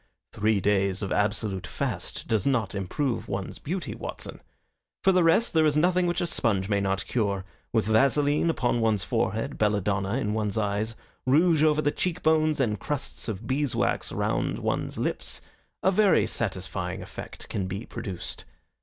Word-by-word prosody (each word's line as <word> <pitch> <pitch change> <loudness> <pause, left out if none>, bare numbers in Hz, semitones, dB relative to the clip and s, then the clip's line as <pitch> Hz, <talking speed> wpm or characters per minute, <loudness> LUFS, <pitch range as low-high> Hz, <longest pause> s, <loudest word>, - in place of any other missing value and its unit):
"Three 105 -1 +2
days 100 0 +1
of 95 - -3
absolute 100 -3 0
fast - - -3
does 110 -1 +1
not 115 -8 +1
improve 115 +7 -2
one's 95 0 -4
beauty, 175 +4 -3
Watson. - - -6 0.6
For 195 - +6
the 180 -1 +4
rest, 165 +8 +4
there 160 -1 +4
is 150 0 +2
nothing 180 +2 +3
which 175 - 0
a - - +1
sponge 105 - 0
may 100 -1 +1
not 95 0 0
cure. 100 -5 -1 0.3
With 110 -2 +2
vaseline 145 +8 +3
upon 120 -6 +1
one's 110 -3 +2
forehead, 110 +2 -1
belladonna 100 -1 +1
in 105 -5 0
one's 105 -1 -1
eyes, 105 +1 -1 0.3
rouge 160 +3 +4
over 155 -1 +4
the 145 - +2
cheek 180 +2 -2
bones, 155 -1 +3
and 110 -6 +1
crusts 145 +5 -3
of 110 -1 -4
beeswax 135 +1 0
round - - 0
one's - - -2
lips, - - -2 0.4
a 190 - +5
very 200 0 +4
satisfying 95 -3 -2
effect - - -9
can 95 -2 -2
be 100 +5 -5
produced. 100 -7 -5
110 Hz, 165 wpm, -27 LUFS, 100-150 Hz, 0.6 s, For